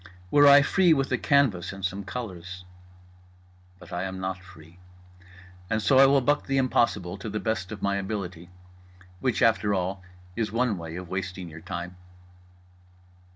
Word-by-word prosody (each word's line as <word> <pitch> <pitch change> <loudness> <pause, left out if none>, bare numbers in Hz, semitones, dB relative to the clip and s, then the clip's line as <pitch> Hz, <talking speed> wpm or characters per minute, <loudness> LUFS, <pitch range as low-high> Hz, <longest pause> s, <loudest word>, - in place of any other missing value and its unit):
Were 145 0 +6
I 140 0 +8
free 180 +2 +4
with 135 -1 -1
a 125 - +2
canvas 135 -13 +2
and 95 0 -5
some 95 +2 -3
colours… 95 -5 -7 1.1
but 90 0 -13
I 90 - -2
am 95 0 -5
not 95 0 -4
free. 85 -1 -16 0.9
And 110 - +1
so 130 +5 +4
I 135 - +8
will 140 0 +4
buck 145 +4 +1
the 135 -1 0
impossible 105 -8 +1
to 110 - -6
the 105 +1 -3
best 110 -4 -2
of 105 -3 -7
my 100 0 +1
ability. 95 -4 -5 0.7
Which, 130 -4 0
after 110 -2 +3
all, 95 +1 -2 0.3
is 110 0 -2
one 115 -1 +1
way 80 0 -7
of 90 0 -7
wasting 90 -1 -5
your 80 0 -11
time. 85 +2 -6
100 Hz, 165 wpm, -26 LUFS, 90-125 Hz, 1.1 s, I